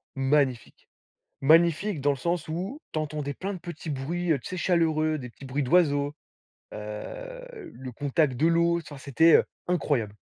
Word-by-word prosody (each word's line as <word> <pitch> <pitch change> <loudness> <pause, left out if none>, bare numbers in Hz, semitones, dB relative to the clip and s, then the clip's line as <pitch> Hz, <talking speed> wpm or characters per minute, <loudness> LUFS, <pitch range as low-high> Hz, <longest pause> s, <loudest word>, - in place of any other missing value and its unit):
magnifique! 135 -3 0 0.5
Magnifique 165 +4 +4
dans 145 +1 +2
le - - -3
sens 170 +4 -1
où 190 - -4
tu 155 - -1
entendais 150 -2 -3
plein 195 +2 -4
de - - -6
petits 170 -2 -7
bruits, 165 +6 -2
heu, 145 - +1
tu - - -13
sais 185 - -5
chaleureux, 160 -3 +1
des 125 -3 -7
petits 135 - -14
bruits 140 +3 -1
d'oiseaux, 145 -2 +3 0.6
heu, - - -8
le 130 -1 -8
contact 140 +1 0
de 155 - +3
l'eau, 170 0 +3
enfin 150 -3 -10
c'était, 145 +4 +4
heu, - - +2 0.2
incroyable! 140 - 0
155 Hz, 170 wpm, -27 LUFS, 140-175 Hz, 0.6 s, Magnifique